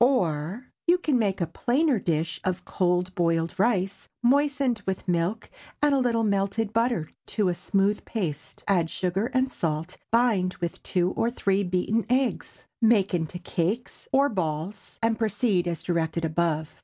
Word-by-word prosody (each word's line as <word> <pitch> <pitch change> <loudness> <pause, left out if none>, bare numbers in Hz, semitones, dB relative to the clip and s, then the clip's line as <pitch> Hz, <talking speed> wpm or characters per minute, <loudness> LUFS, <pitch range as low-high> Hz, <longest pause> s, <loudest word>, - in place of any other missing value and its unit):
Or, 190 - +1 0.2
You 350 +1 +6
can 300 -8 +1
make 195 -4 0
a - - +3
plainer 260 - +1
dish 160 -2 -1
of 185 0 -2
cold 180 0 0
boiled 165 -1 +1
rice, 195 -3 +1 0.2
moistened 275 -2 +2
with 190 0 -2
milk 175 +5 0 0.3
and 295 -1 +3
a 275 - +3
little 235 -3 +1
melted 200 +1 0
butter 230 -8 +1 0.2
to 205 -4 +1
a - - +1
smooth 195 +3 0
paste. 165 -10 -4
Add 175 -5 +2
sugar 190 +6 -1
and 260 0 +1
salt, 165 -1 -2
bind 220 -6 +2
with 170 -1 -4
two 180 0 0
or 230 - 0
three 200 -4 +1
beaten 185 +5 0
eggs; 255 0 -1 0.2
make 220 -4 +4
into 170 0 -1
cakes 180 +6 -2
or 275 +1 +4
balls, 180 - -4
and 225 -1 +2
proceed 210 -4 +1
as 170 -2 -3
directed 165 -1 0
above. 160 -1 -1
195 Hz, 155 wpm, -26 LUFS, 175-235 Hz, 0.3 s, You